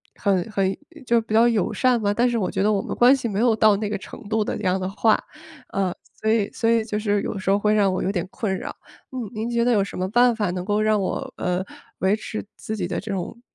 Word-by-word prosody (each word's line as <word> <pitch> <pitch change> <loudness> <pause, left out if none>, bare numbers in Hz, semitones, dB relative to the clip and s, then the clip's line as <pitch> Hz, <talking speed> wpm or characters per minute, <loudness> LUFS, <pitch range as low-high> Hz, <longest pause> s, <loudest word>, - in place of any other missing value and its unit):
很 195 0 0
很 195 -1 0 0.3
就 235 -1 +3
比 220 -1 -6
较 230 +2 +6
友 225 -5 +1
善 255 -2 +2
吧， 205 0 +1
但 240 +3 +2
是 235 - 0
我 190 - 0
觉 - - -1
得 210 - +3
我 200 -2 +1
们 - - -5
关 250 +3 +6
系 255 - -3
没 205 -2 -2
有 235 -1 +4
到 215 -1 +5
那 210 0 -2
个 210 - -2
程 205 - -11
度 220 -1 +1
的 - - -3
那 - - -7
样 185 0 +1
的 185 0 -2
话， 215 +2 +2 0.5
呃， 190 -2 0 0.3
所 220 - -1
以 215 -3 +2
所 225 - 0
以 230 -1 +3
就 215 -1 -3
是 205 -1 0
有 - - -4
时 190 - -3
候 200 +1 +4
会 210 +1 +2
让 200 -3 +3
我 - - -1
有 195 - 0
点 180 -2 -2
困 190 -4 -2
扰。 - - -6 0.4
嗯， 250 -5 -5
您 220 +1 -3
觉 235 -1 +1
得 245 - +3
有 210 -4 +3
什 195 - -7
么 185 +1 -1
办 240 +2 +4
法 210 -4 -1
能 180 0 -4
够 210 +1 +1
让 215 -1 +2
我， - - -3
呃， 180 +1 -1 0.4
维 190 +2 +3
持 215 0 -6 0.2
自 220 - -4
己 180 -5 -2
的 180 - -2
这 215 - -6
种， 195 +5 -5
210 Hz, 295 characters per minute, -23 LUFS, 195-225 Hz, 0.5 s, 较